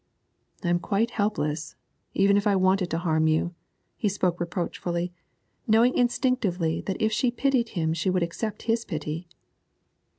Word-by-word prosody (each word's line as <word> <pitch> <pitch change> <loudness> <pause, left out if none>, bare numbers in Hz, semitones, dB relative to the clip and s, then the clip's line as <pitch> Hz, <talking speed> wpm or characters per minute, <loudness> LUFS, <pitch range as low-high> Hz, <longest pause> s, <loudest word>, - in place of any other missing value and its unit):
'I - - -1
am 175 0 +3
quite 220 +5 0
helpless, 155 -8 -1 0.4
even 200 +1 +4
if 205 +1 +2
I 200 - +4
wanted 185 -1 +2
to 165 - -1
harm 160 -2 +2
you.' 160 +2 +1 0.4
He 210 - +1
spoke 185 -3 0
reproachfully, 175 0 -2 0.5
knowing 230 +3 +4
instinctively 235 - +1
that 190 - -2
if 220 0 +2
she 240 +3 +2
pitied 250 -1 +1
him 160 -1 +1
she 165 +3 0
would 185 -1 +2
accept 210 +5 -4
his 225 0 +1
pity. 155 -1 -4
185 Hz, 155 wpm, -26 LUFS, 170-220 Hz, 0.5 s, even